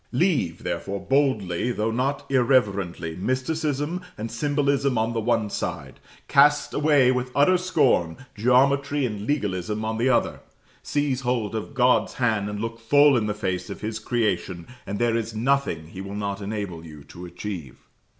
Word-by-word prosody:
Leave, 140 - 0
therefore, 100 +1 -3
boldly, 125 -7 0
though 110 -1 -1
not 135 +4 -1
irreverently, 100 -10 +1
mysticism 145 - -2 0.2
and 110 +1 -5
symbolism 140 +1 0
on 110 +1 0
the 115 - -1
one 110 0 +1
side; 100 - -5 0.3
cast 145 +1 +4
away 145 -4 +4
with 125 0 -1
utter 145 +7 +5
scorn 145 - +1 0.2
geometry 140 +5 +2
and 105 -3 -4
legalism 105 - -1
on 110 0 -2
the 125 +3 +2
other; 130 - +1 0.4
seize 145 -3 -1
hold 120 -5 -1
of 110 +6 -5
God's 125 0 +3
hand 110 -5 0
and 105 0 -5
look 115 +1 -4
full 145 +5 +5
in 110 -3 +1
the 105 - -2
face 95 -3 -3
of - - -7
His 110 +1 -3
creation, 95 -7 -1 0.2
and 100 +1 -3
there 120 0 +1
is 115 -1 -3
nothing 115 - 0
He 95 - -8
will 100 +1 -7
not 100 -1 -3
enable 100 -5 -5
you 75 -3 -11
to 90 +4 -11
achieve. 85 -6 -7
115 Hz, 160 wpm, -24 LUFS, 100-140 Hz, 0.4 s, utter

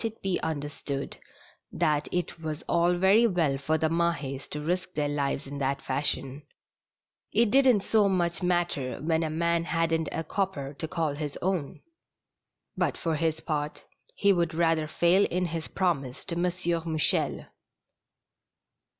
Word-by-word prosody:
it 225 0 -3
be 190 -2 0
understood 145 -2 -4 0.6
that 150 -4 0
it 180 -1 -2
was 155 0 -4
all 175 +1 +3
very 195 +6 +5
well 170 -9 +1
for 140 +4 0
the 160 0 +1
Mah^s 160 -5 -1
to 150 - -4
risk 180 +4 -2
their 150 -1 +1
lives 145 -1 -1
in 140 +1 -6
that 135 0 0
fashion; 135 0 -1 0.9
it 230 -2 +3
didn't 260 -5 +5
so 205 0 +3
much 175 -1 0
matter 175 -7 0
when 160 0 +1
a 160 - -1
man 170 +1 +1
hadn't 165 -1 0
a 165 - -2
copper 155 -8 -2
to 160 - -5
call 160 -2 -1
his 145 -1 -5
own; 180 -6 -1 1.0
but - - 0
for 165 -2 -1
his 160 0 0
part, 150 -2 -3 0.3
he 200 0 +4
would 170 -2 0
rather 165 -2 +2
fail 175 +5 +3
in 180 +1 -1
his 165 -1 -4
promise 140 -9 -1
to 175 - -2
M. 175 +1 +1 0.4
Mouchel. 160 -2 0
165 Hz, 150 wpm, -28 LUFS, 150-180 Hz, 1.0 s, very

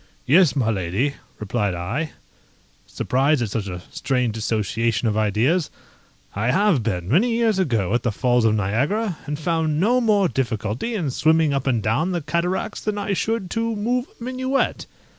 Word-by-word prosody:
"Yes, 160 -2 +5
my 120 -5 +1
lady," 100 +8 -1 0.2
replied 105 -2 -1
I, 115 - -3 0.7
surprised 135 +1 +1
at 110 - -4
such 105 -2 -2
a 90 -2 -6
strange 125 -4 -1
association 110 +1 0
of 105 - 0
ideas; 115 - +1 0.7
"I 110 +4 0
have 190 - +3
been, 90 -6 -2
many 180 - +3
years 225 -4 +2
ago, 115 - 0
at 120 - +2
the 115 - 0
Falls 120 +2 +1
of 110 -1 +3
Niagara, 145 - 0
and 145 0 -2
found 160 -1 0
no 240 +7 +3
more 210 -4 +3
difficulty 120 - -2
in 160 -10 -1
swimming 160 +2 +3
up 140 0 -1
and 120 -5 +1
down 155 +12 +1
the 175 - -1
cataracts 170 +7 -2
than 210 -1 -2
I 200 -1 -1
should 215 -1 -2
to 230 0 -1
move 245 +5 -1
a - - -8
minuet." 260 +2 -1
140 Hz, 170 wpm, -22 LUFS, -, 0.7 s, Yes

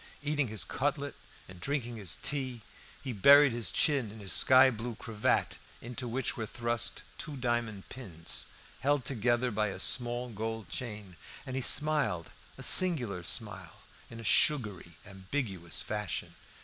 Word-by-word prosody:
Eating 150 -2 0
his 110 -4 -2
cutlet 140 +6 -3 0.3
and 90 -1 -13
drinking 120 - -3
his 95 -7 0
tea, 130 -5 -3 0.4
he 130 -3 -5
buried 140 +6 +6
his 115 -6 -1
chin 140 - +1
in 110 - -12
his 100 -2 -1
sky 130 0 +5
blue 115 0 -6
cravat, 105 -1 -2 0.2
into 125 +2 -6
which 125 +3 -2
were 110 -2 -5
thrust 120 0 -1 0.2
two 145 -2 -7
diamond 120 -5 -3
pins, 90 -11 -3 0.3
held 145 -2 0
together 120 0 0
by 105 0 -1
a 100 - -6
small 120 0 +1
gold 110 0 -5
chain; 105 -7 -8 0.3
and 130 -2 -6
he 130 - -2
smiled 145 - +5 0.3
a - - -7
singular 125 - +4
smile, 95 -2 -4 0.3
in 115 - -11
a - - -9
sugary, 105 - +2
ambiguous 95 -2 -5
fashion. 105 -2 -5
120 Hz, 150 wpm, -30 LUFS, 105-130 Hz, 0.4 s, buried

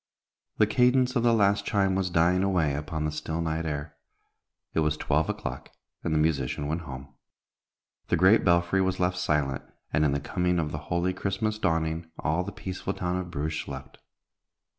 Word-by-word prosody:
The 110 - +5
cadence 125 +3 +3
of 120 - +3
the 120 0 +4
last 100 -3 +3
chime 95 -2 +1
was 95 -1 0
dying 85 +1 +3
away 90 -7 +2
upon 75 +2 -3
the 75 - -1
still 80 +1 -4
night 80 0 -1
air. 70 -1 -4 0.8
It - - +1
was 75 -1 +1
twelve - - +1
o'clock, - - -4 0.3
and 80 - -1
the 80 - +2
musician 75 -3 0
went 80 +4 -2
home. 70 -2 -9 0.9
The 85 - +2
great 95 +6 +5
belfry 85 +2 +3
was 95 0 0
left 90 0 +1
silent, 75 -6 0 0.3
and 75 - +3
in 75 - +3
the 70 - 0
coming 90 +4 0
of 80 -3 -1
the 75 - -4
holy 85 +2 +1
Christmas 100 +3 -2
dawning 80 -2 0
all 80 +4 0
the 100 - -6
peaceful 95 0 -4
town 90 0 -1
of 90 -1 -4
Bruges 80 -1 -2
slept. 65 -1 -9
85 Hz, 185 wpm, -27 LUFS, 75-95 Hz, 0.9 s, The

